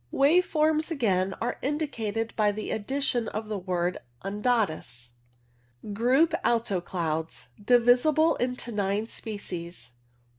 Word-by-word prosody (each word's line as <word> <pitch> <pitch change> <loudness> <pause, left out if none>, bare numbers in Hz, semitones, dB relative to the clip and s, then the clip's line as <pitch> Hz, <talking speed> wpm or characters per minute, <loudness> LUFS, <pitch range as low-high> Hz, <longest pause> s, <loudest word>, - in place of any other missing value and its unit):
Wave 320 +7 +4
forms 310 0 +2
again 195 - +1
are 235 - -2
indicated 230 -7 -2
by 210 -1 +3
the 210 +1 -5
addition 245 +1 0
of 215 0 -5
the 210 -2 -2
word 180 -1 -1 0.3
undatus. 195 - -1 0.8
Group 255 +10 +3
Alto 225 -6 +1
Clouds. 160 -7 -3
Divisible 250 +8 +4
into 250 -1 -2
nine 205 +1 -1
species. 180 - -6
220 Hz, 110 wpm, -27 LUFS, 190-255 Hz, 0.8 s, Wave